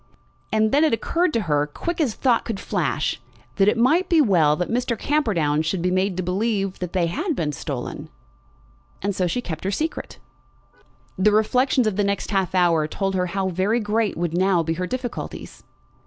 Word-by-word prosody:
And 220 Hz, 0 st, +2 dB
then 290 Hz, +3 st, +4 dB
it 310 Hz, -, +3 dB
occurred 335 Hz, +9 st, +1 dB
to 230 Hz, -, +1 dB
her, 150 Hz, -5 st, +1 dB
quick 340 Hz, -, -4 dB
as 250 Hz, -8 st, 0 dB
thought 245 Hz, -4 st, +2 dB
could 220 Hz, -5 st, -4 dB
flash, 155 Hz, -, -1 dB, 0.4 s
that 195 Hz, -, +4 dB
it 210 Hz, -, +3 dB
might 310 Hz, +10 st, +3 dB
be 335 Hz, -, +4 dB
well 175 Hz, -, +4 dB
that 180 Hz, +2 st, -2 dB
Mr. 235 Hz, 0 st, -1 dB
Camperdown 180 Hz, -, +1 dB
should 165 Hz, +2 st, -2 dB
be 180 Hz, -, +1 dB
made 185 Hz, 0 st, 0 dB
to 185 Hz, -, -1 dB
believe 195 Hz, +1 st, -1 dB
that 180 Hz, -2 st, -5 dB
they 180 Hz, -3 st, +2 dB
had 310 Hz, -, -2 dB
been 155 Hz, -9 st, -1 dB
stolen. 140 Hz, -3 st, -6 dB, 0.9 s
And 200 Hz, -1 st, -1 dB
so 185 Hz, -2 st, +1 dB
she 245 Hz, +8 st, -1 dB
kept 160 Hz, -3 st, -6 dB
her 190 Hz, -, -1 dB
secret. 310 Hz, +11 st, -3 dB, 1.0 s
The 210 Hz, +3 st, +4 dB
reflections 250 Hz, +4 st, +2 dB
of 210 Hz, -3 st, -1 dB
the 205 Hz, -, +2 dB
next 200 Hz, +1 st, -2 dB
half 190 Hz, -2 st, 0 dB
hour 170 Hz, -4 st, +3 dB
told 195 Hz, +4 st, -2 dB
her 180 Hz, -1 st, 0 dB
how 190 Hz, +1 st, -1 dB
very 190 Hz, +6 st, +1 dB
great 215 Hz, 0 st, 0 dB
would 170 Hz, -1 st, -2 dB
now 185 Hz, -1 st, +2 dB
be 165 Hz, 0 st, -1 dB
her 180 Hz, +2 st, -3 dB
difficulties. 255 Hz, +1 st, -6 dB
195 Hz, 195 wpm, -23 LUFS, 175-230 Hz, 1.0 s, then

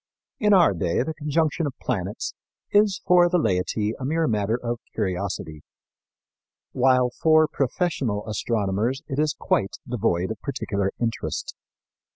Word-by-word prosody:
In 210 Hz, -1 st, +3 dB
our 180 Hz, -, +6 dB
day 85 Hz, +4 st, 0 dB
the 160 Hz, -, -4 dB
conjunction 155 Hz, +1 st, 0 dB
of 135 Hz, -, -7 dB
planets 100 Hz, -5 st, -3 dB, 0.4 s
is 205 Hz, -1 st, +3 dB
for 175 Hz, -1 st, +5 dB
the 180 Hz, -, +2 dB
laity 105 Hz, -, 0 dB
a -, -, -6 dB
mere 160 Hz, +4 st, +1 dB
matter 110 Hz, 0 st, 0 dB
of 120 Hz, -1 st, -3 dB, 0.2 s
curiosity, 90 Hz, -6 st, -3 dB, 1.1 s
while 125 Hz, -1 st, +3 dB
for 155 Hz, +2 st, +4 dB
professional 135 Hz, -, -1 dB
astronomers 110 Hz, +3 st, -1 dB
it 140 Hz, -1 st, -3 dB
is 150 Hz, -1 st, +1 dB
quite 95 Hz, -, 0 dB
devoid 105 Hz, -6 st, 0 dB
of 110 Hz, -, -7 dB
particular 100 Hz, -8 st, -2 dB
interest. 115 Hz, -1 st, -3 dB
125 Hz, 135 wpm, -24 LUFS, 105-155 Hz, 1.1 s, our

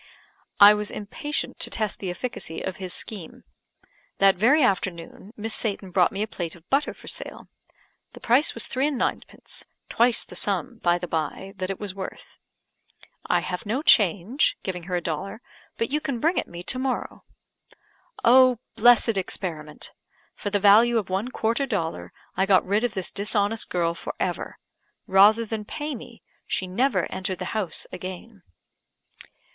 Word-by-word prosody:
I 205 Hz, +1 st, +10 dB
was 210 Hz, 0 st, -2 dB
impatient 295 Hz, +9 st, -4 dB
to -, -, +3 dB
test 215 Hz, -3 st, -2 dB
the 190 Hz, -, -4 dB
efficacy 175 Hz, -4 st, -4 dB
of 190 Hz, -, -4 dB
his 185 Hz, -2 st, -5 dB
scheme 185 Hz, -2 st, -3 dB, 0.7 s
That 195 Hz, 0 st, +6 dB
very 260 Hz, -, +4 dB
afternoon 185 Hz, -2 st, -2 dB
Miss 220 Hz, +1 st, -2 dB
Satan 200 Hz, -4 st, -2 dB
brought 180 Hz, -1 st, +3 dB
me 200 Hz, +2 st, -2 dB
a -, -, -3 dB
plate 175 Hz, -6 st, -5 dB
of 170 Hz, 0 st, -19 dB
butter 280 Hz, +2 st, +1 dB
for -, -, -15 dB
sale. -, -, -3 dB, 0.6 s
The -, -, -11 dB
price 250 Hz, +6 st, +3 dB
was -, -, 0 dB
three 265 Hz, +2 st, 0 dB
and 295 Hz, -3 st, -2 dB
ninepence; -, -, -3 dB, 0.3 s
twice 235 Hz, 0 st, +3 dB
the -, -, -13 dB
sum, 205 Hz, +6 st, -1 dB
by 175 Hz, 0 st, +3 dB
the 180 Hz, -, -5 dB
bye, 165 Hz, +4 st, -3 dB
that 185 Hz, 0 st, -3 dB
it 195 Hz, -, -4 dB
was 205 Hz, -3 st, -4 dB
worth. 190 Hz, -1 st, -9 dB, 0.9 s
"I -, -, +2 dB
have 180 Hz, +3 st, -5 dB
no 255 Hz, +8 st, -1 dB
change," 210 Hz, -, +4 dB
giving 180 Hz, -3 st, -4 dB
her 180 Hz, -1 st, -2 dB
a 175 Hz, -, 0 dB
dollar; 185 Hz, +5 st, -4 dB, 0.4 s
"but 230 Hz, +2 st, -1 dB
you 300 Hz, +1 st, 0 dB
can 275 Hz, -6 st, -3 dB
bring 330 Hz, +8 st, +2 dB
it -, -, -4 dB
me 175 Hz, 0 st, -8 dB
to 255 Hz, -, 0 dB
morrow." 260 Hz, -1 st, -3 dB, 1.0 s
Oh, 255 Hz, 0 st, +6 dB, 0.2 s
blessed 230 Hz, -1 st, +5 dB
experiment! 160 Hz, -5 st, -5 dB, 0.4 s
for 205 Hz, -, -4 dB
the 205 Hz, -, +1 dB
value 220 Hz, +4 st, +6 dB
of 200 Hz, -4 st, -2 dB
one 195 Hz, +5 st, -1 dB
quarter 235 Hz, +3 st, 0 dB
dollar 160 Hz, -, -3 dB, 0.2 s
I 190 Hz, -, +1 dB
got 195 Hz, -2 st, +4 dB
rid 205 Hz, +4 st, +1 dB
of 240 Hz, -2 st, -1 dB
this 190 Hz, -2 st, -1 dB
dishonest 205 Hz, +1 st, -1 dB
girl 170 Hz, -2 st, 0 dB
for -, -, -7 dB
ever; -, -, -3 dB, 0.5 s
rather 210 Hz, +4 st, +5 dB
than 220 Hz, -1 st, -4 dB
pay 295 Hz, +7 st, -5 dB
me, 235 Hz, -, -11 dB, 0.2 s
she 190 Hz, -, -1 dB
never 190 Hz, +1 st, +1 dB
entered 185 Hz, 0 st, -3 dB
the 185 Hz, -, -5 dB
house 210 Hz, -5 st, -2 dB
again. 185 Hz, +3 st, -8 dB
205 Hz, 170 wpm, -25 LUFS, 185-235 Hz, 1.0 s, I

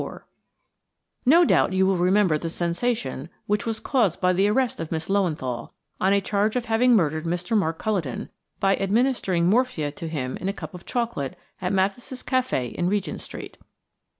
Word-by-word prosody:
4 -, -, -8 dB, 1.0 s
NO 335 Hz, +6 st, +7 dB
doubt 185 Hz, -, +3 dB
you 190 Hz, 0 st, +3 dB
will 190 Hz, 0 st, +3 dB
remember 185 Hz, -1 st, +3 dB
the 165 Hz, +2 st, -3 dB
sensation 170 Hz, -, -2 dB, 0.2 s
which 210 Hz, +2 st, -1 dB
was 225 Hz, -1 st, -1 dB
caused 225 Hz, -, +1 dB
by 180 Hz, 0 st, +3 dB
the 195 Hz, +3 st, +3 dB
arrest 245 Hz, +4 st, +1 dB
of 165 Hz, -, -5 dB
Miss 160 Hz, +1 st, -3 dB
Löwenthal, 155 Hz, -11 st, -1 dB, 0.3 s
on 190 Hz, -, +3 dB
a 200 Hz, -, +4 dB
charge 205 Hz, +2 st, 0 dB
of 245 Hz, -1 st, -1 dB
having 235 Hz, +2 st, +4 dB
murdered 160 Hz, -4 st, +1 dB
Mr. 175 Hz, +5 st, -1 dB
Mark 165 Hz, -6 st, +1 dB
Culledon, 180 Hz, -, -2 dB, 0.3 s
by 195 Hz, 0 st, +3 dB
administering 195 Hz, -4 st, +1 dB
morphia 205 Hz, -, +1 dB
to 165 Hz, +3 st, -7 dB
him 135 Hz, -5 st, -3 dB
in 190 Hz, -, -3 dB
a -, -, -1 dB
cup 200 Hz, -, -8 dB
of 180 Hz, -, -11 dB
chocolate 235 Hz, -, -2 dB, 0.2 s
at 180 Hz, 0 st, -1 dB
Mathis' 200 Hz, +7 st, -1 dB
café 255 Hz, -, 0 dB
in 175 Hz, 0 st, 0 dB
Regent 205 Hz, 0 st, -2 dB
Street. -, -, -9 dB
195 Hz, 180 wpm, -24 LUFS, 165-225 Hz, 1.0 s, NO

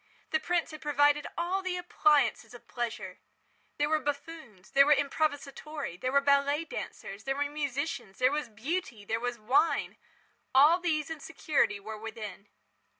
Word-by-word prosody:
The 315 Hz, -, +2 dB
prince 340 Hz, +1 st, 0 dB
had 310 Hz, -, -9 dB
provided 290 Hz, -1 st, +3 dB
all 360 Hz, +3 st, 0 dB
the 370 Hz, -1 st, -2 dB
appliances 305 Hz, -7 st, +2 dB
of 245 Hz, -, -14 dB
pleasure. 240 Hz, -2 st, -4 dB, 0.6 s
There 290 Hz, -, +2 dB
were 310 Hz, 0 st, +2 dB
buffoons, 285 Hz, -, -6 dB
there 275 Hz, +1 st, +6 dB
were 300 Hz, -, +7 dB
improvisatori, 285 Hz, -, -2 dB
there 255 Hz, -, 0 dB
were 280 Hz, +1 st, +4 dB
ballet 280 Hz, +2 st, +3 dB
dancers, 200 Hz, -8 st, -7 dB
there 270 Hz, 0 st, 0 dB
were 285 Hz, +1 st, 0 dB
musicians, 285 Hz, -6 st, -3 dB
there 255 Hz, +1 st, +4 dB
was 295 Hz, -4 st, -2 dB
Beauty, 235 Hz, -, -4 dB
there 225 Hz, +2 st, -1 dB
was 245 Hz, 0 st, -2 dB
wine. 250 Hz, +9 st, +1 dB, 0.6 s
All 300 Hz, +6 st, +7 dB
these 320 Hz, -3 st, -1 dB
and 315 Hz, -2 st, -6 dB
security 290 Hz, -10 st, 0 dB
were 215 Hz, +2 st, -7 dB
within. 215 Hz, -2 st, -7 dB
285 Hz, 155 wpm, -30 LUFS, 240-310 Hz, 0.6 s, were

